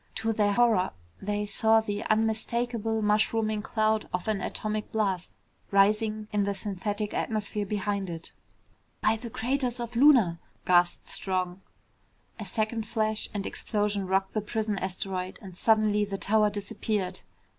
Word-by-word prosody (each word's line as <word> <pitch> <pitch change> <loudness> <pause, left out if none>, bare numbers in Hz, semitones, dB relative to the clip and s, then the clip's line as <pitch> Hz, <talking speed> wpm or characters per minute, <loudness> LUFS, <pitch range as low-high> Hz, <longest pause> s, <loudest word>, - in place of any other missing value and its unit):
To 225 0 0
their 205 -1 +2
horror, 225 -5 +3 0.3
they 205 +1 -1
saw 220 +2 +3
the 205 -2 -3
unmistakable 225 0 0
mushrooming 215 0 +2
cloud 215 0 0
of 180 +2 -3
an 210 -3 0
atomic 215 +2 -3
blast 195 -5 -1 0.4
rising 215 +2 +2
in 205 -1 +2
the 200 0 -1
synthetic 205 +2 -3
atmosphere 210 -1 -2
behind 200 -1 -1
it. 165 -1 -7 0.7
"By 215 +1 +3
the 235 +1 -7
craters 250 +2 -1
of 235 0 -5
Luna 235 - +5
" - - -37
gasped 175 -1 +3
Strong. 185 -1 -1 0.8
A 215 - -5
second 220 +3 -2
flash 215 -1 -1
and 205 -2 -3
explosion 205 -2 -1
rocked 190 +1 +1
the 215 - 0
prison 210 -1 -2
asteroid 185 0 -3
and 190 -4 -11
suddenly 215 0 +3
the 200 -1 -3
tower 210 +3 +3
disappeared. 200 -2 -2
210 Hz, 145 wpm, -28 LUFS, 195-220 Hz, 0.8 s, Luna